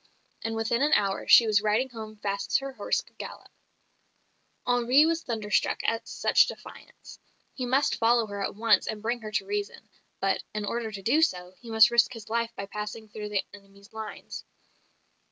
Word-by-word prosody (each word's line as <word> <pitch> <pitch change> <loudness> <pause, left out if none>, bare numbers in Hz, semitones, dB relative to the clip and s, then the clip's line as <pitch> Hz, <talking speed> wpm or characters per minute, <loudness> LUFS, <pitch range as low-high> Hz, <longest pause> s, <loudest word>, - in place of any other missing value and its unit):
And 225 0 -3
within 225 +2 0
an 295 +2 +3
hour 195 -1 +1
she 235 - +8
was 210 -2 +3
riding 215 +5 +1
home 220 -2 -9
fast 200 -1 -3
as - - +7
her 275 0 -5
horse - - -1
could - - -24
gallop. - - -9 1.1
Henri 245 +4 +4
was 330 0 0
thunderstruck 220 -6 -1
at 230 0 -1
such - - +3
defiance. - - -11 0.3
He 255 -2 -4
must 270 +3 +2
follow 235 0 +3
her 200 -1 -5
at - - -3
once 225 +1 +3
and 215 -1 -5
bring 235 +2 -1
her 215 - -6
to 210 -3 0
reason; 205 +2 -4 0.3
but, 195 0 0
in 210 -1 -2
order 225 +1 -3
to 195 -2 -8
do 275 +10 +3
so, 180 - 0
he 235 - -12
must 220 +1 +6
risk 235 +1 +3
his 225 -2 -10
life 230 0 0
by 200 - -5
passing 210 +2 -7
through 210 0 -7
the 205 -2 -1
enemy's 200 +1 -16
lines. 220 -1 -7
220 Hz, 190 wpm, -27 LUFS, 205-235 Hz, 1.1 s, she